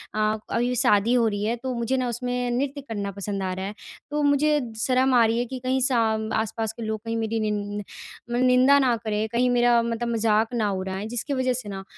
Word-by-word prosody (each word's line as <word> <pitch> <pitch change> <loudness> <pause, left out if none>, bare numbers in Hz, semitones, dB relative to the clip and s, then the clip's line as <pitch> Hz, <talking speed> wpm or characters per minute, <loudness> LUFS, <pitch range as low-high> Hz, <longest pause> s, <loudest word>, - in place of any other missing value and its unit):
अ, 215 0 +1
अभी 245 +1 0
शादी 210 0 +3
हो 240 -2 +3
रही 205 -1 -2
है, 225 +3 0
तो 255 +2 -4
मुझे 235 +3 -1
ना 255 -1 0
उसमें 245 +1 -2
नृत्य 280 +1 -2
करना 205 -7 -4
पसंद 200 0 -4
आ 185 - -2
रहा 190 +1 -4
है। 205 - -5 0.4
तो 295 0 0
मुझे 295 +1 +3 0.2
शर्म 260 +1 +2
आ 240 - +6
रही 225 +1 +1
है 245 - 0
कि 255 +1 -6
कहीं 255 +1 0
साम 220 -4 +1
आसपास 220 0 -1
के 230 - -8
लोग 220 0 -3
कहीं 230 0 -2
मेरी 225 0 -1
निन् 205 -1 -2 0.5
मन 245 +1 +1
निंदा 255 +2 +5
ना 255 -3 +3
करें, 215 0 -1
कहीं 245 +3 +1
मेरा 240 -1 +4
मतलब 235 0 -2
मज़ाक 225 +1 +1
ना 215 -3 0
उड़ाएँ, 190 +2 -4
जिसकी 245 +5 -2
वजह 255 -1 +1
से 205 - -8
ना 195 -1 -6
230 Hz, 225 wpm, -24 LUFS, 215-250 Hz, 0.5 s, आ